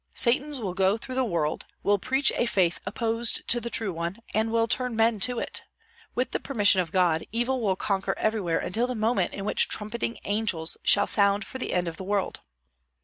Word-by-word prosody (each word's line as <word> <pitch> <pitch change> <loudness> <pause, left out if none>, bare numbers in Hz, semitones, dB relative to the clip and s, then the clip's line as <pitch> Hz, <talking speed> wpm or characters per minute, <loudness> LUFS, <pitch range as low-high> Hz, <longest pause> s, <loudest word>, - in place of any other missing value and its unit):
Satans 270 +3 +2
will 195 -6 -3
go 190 +3 +2
through 255 +3 -7
the 260 0 +1
world, 165 -9 -2 0.2
will 205 0 +3
preach 265 +6 +2
a 240 - +1
faith 185 -5 +1
opposed 230 0 0
to 240 - +1
the 235 - -4
true 220 -5 0
one, 170 +4 -3 0.2
and 220 +1 +1
will 230 0 +2
turn 250 0 0
men 225 -1 +2
to 245 +4 0
it. - - -2 0.5
With 250 +1 -1
the - - -1
permission 205 -8 +3
of 170 -3 -6
God, 175 -3 +2
evil 240 +3 0
will 195 -4 +1
conquer 195 0 -1
everywhere 210 -7 0
until 230 +6 -1
the 250 - -3
moment 225 +2 0
in 195 - -5
which - - +4
trumpeting 230 +2 -3
angels 205 -6 -1
shall 205 0 +4
sound 200 0 +2
for 260 - -7
the - - -3
end 180 -1 0
of 165 -1 -5
the - - -6
world." 200 0 -2
215 Hz, 205 wpm, -26 LUFS, 190-235 Hz, 0.5 s, which